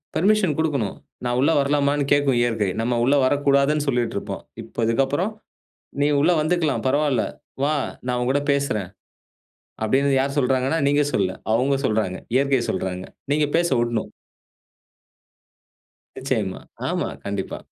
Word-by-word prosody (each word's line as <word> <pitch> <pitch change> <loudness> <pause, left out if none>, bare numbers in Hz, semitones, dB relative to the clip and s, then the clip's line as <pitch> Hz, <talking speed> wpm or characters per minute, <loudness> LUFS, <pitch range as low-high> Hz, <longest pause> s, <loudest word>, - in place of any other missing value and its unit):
Permission 190 -4 +3
குடுக்கணும். 145 -10 -1 0.3
நான் 120 0 0
உள்ள 145 +4 +4
வரலாமானு 140 0 +1
கேட்கும் 140 -4 +2
இயற்கை. 110 -4 +1
நம்ம 120 +2 0
உள்ள 135 +4 +3
வரக்கூடாதுனு 140 +2 +2
சொல்லிட்டுருப்போம். 120 -3 -2 0.2
இப்ப 115 - -3
இதுக்கப்புறம் 135 - +1 0.7
நீ 145 - +4
உள்ள 160 +5 +4
வந்துக்கலாம். 160 -2 0
பரவால்ல 145 -1 +2 0.4
வா 155 +1 +1 0.3
நான் 125 0 0
உன்கூட 135 +3 +1
பேசுறன். 140 -10 -1 0.9
அப்டின்னு 135 +4 +2
யார் 140 +1 -1
சொல்றாங்கன்னா. 135 +4 +1
நீங்க 145 +1 +3
சொல்ல. 95 -2 +1 0.2
அவங்க 135 +4 +2
சொல்றாங்க. 105 -5 0 0.2
இயற்கையை 135 -2 +2
சொல்றாங்க. 95 0 -3 0.3
நீங்க 150 0 +2
பேச 170 0 +2
உட்ணும். 120 -2 -2 2.1
நிச்சயமா. 110 -8 -2 0.3
ஆமா. - - -1 0.2
கண்டிப்பா. 100 -1 -3
135 Hz, 120 wpm, -23 LUFS, 120-145 Hz, 2.1 s, உள்ள